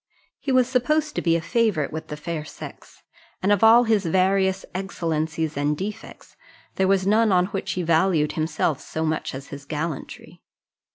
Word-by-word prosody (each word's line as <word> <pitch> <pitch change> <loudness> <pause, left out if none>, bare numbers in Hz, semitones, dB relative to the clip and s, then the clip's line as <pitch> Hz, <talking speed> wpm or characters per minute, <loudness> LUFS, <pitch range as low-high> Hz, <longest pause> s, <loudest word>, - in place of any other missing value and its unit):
He 275 - -3
was 255 -2 +4
supposed 300 +4 +1
to - - -2
be 165 -1 +2
a 165 - 0
favourite 180 - 0
with 160 - -5
the 150 - -6
fair 160 0 -4
sex; - - -11 0.4
and 195 - +3
of 205 0 +3
all 230 +2 +8
his 220 -4 +2
various 190 +2 +1
excellencies 160 -4 -2
and 145 +1 0
defects, 210 +5 -7 0.4
there 190 - +1
was 190 -1 +2
none 215 +2 +3
on 180 -1 +4
which 190 -1 -2
he 180 - -2
valued 165 -2 +2
himself 155 -2 -1
so 160 0 -3
much 155 -3 -2
as 135 0 -7
on - - -18
his 140 0 -8
gallantry. 155 0 -6
180 Hz, 180 wpm, -24 LUFS, 155-205 Hz, 0.4 s, all